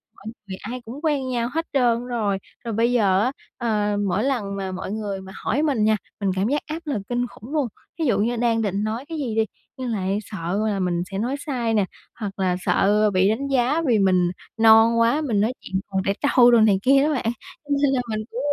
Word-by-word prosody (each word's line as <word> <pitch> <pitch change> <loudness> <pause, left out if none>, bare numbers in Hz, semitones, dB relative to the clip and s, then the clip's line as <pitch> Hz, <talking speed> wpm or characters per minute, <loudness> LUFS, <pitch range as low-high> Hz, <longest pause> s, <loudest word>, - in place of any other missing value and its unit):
mọi - - -18 0.2
người 190 -1 -6
ai 245 +4 -6
cũng 250 +6 -8
quen 280 -4 0
nhau 240 -1 -1
hết 325 +1 -1
trơn 245 -2 +2
rồi. 215 -5 -1 0.3
Rồi 230 - -3
bây 230 +3 +2
giờ 200 -6 +3
á, 255 +4 +1 0.3
ờ, 210 -3 0
mỗi 195 +5 0
lần 225 -8 -1
mà 190 -1 -4
mọi 185 +1 -5
người 205 -3 -4
mà 190 0 -10
hỏi 285 +6 -1
mình 275 -9 +1
nha, 215 0 +3 0.2
mình 200 -2 0
cảm 190 +3 +1
giác 290 +4 0
áp 315 +2 -4
lực 275 -9 -2
kinh 245 0 0
khủng 235 +6 -12
luôn. 290 -5 +1 0.3
Thí 320 - +1
dụ 215 -6 +2
như 235 +4 +1
đang 230 -1 +1
định 200 0 -1
nói 225 +5 -3
cái 325 - -4
gì 245 -7 -3
đi, 220 0 +3 0.3
nhưng 255 -2 -4
lại 195 -1 -1
sợ 185 -1 -3
là 200 -2 -1
mình 175 -2 0
sẽ 195 - -3
nói 245 +6 -1
sai 240 -6 -1
nè, 205 -3 +3 0.3
hoặc 200 -3 -5
là 185 -1 +1
sợ 210 +3 +3
bị 185 +1 +3
đánh 260 +6 -1
giá 270 +4 +2
vì 225 -4 +3
mình 180 -2 +3 0.3
non 225 +1 +6
quá, 235 +7 +3
mình 225 -9 +1
nói 225 +4 +1
chuyện 190 0 -3
còn 190 -1 0
trẻ 195 - +2 0.2
trâu 245 -1 +7
đồ 235 - +6
này 205 -3 +4
kia 275 +1 +5
đó 300 +1 +2
bạn, 235 -3 0 0.3
cho 290 - -23
nên 285 - +3
là 250 - +1
mình 215 - -1
cũng, 240 - -4
225 Hz, 245 wpm, -23 LUFS, 200-250 Hz, 0.3 s, trâu